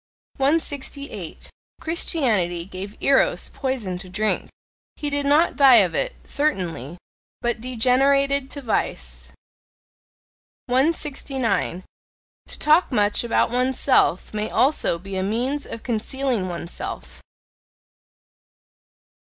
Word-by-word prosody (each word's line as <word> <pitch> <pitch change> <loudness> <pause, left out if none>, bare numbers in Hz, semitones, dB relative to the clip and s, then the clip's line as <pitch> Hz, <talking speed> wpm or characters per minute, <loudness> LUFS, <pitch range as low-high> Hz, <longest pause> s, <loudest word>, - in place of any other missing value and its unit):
168. 280 - -3 0.3
Christianity 220 - 0
gave 195 +2 -8
Eros 275 -1 +3
poison 235 -10 -3
to 185 0 -10
drink; 215 +4 0 0.5
he 295 -1 -4
did 285 0 -1
not 300 +4 +3
die 270 -4 +7
of 190 -7 +5
it, - - -1
certainly, 175 - -2 0.4
but 240 -1 -1
degenerated 270 +3 +2
to 285 - -8
Vice. 230 - -2 1.3
169. 265 - -1 0.6
To - - -4
talk 310 +3 +4
much 210 -3 +2
about 235 -1 +1
oneself 255 -6 +2
may 210 0 -2
also 265 - +2
be 195 +3 -8
a - - 0
means 245 +9 -1
of 230 - -7
concealing 240 -3 -1
oneself. 65 - -7
250 Hz, 100 wpm, -23 LUFS, 195-280 Hz, 1.3 s, die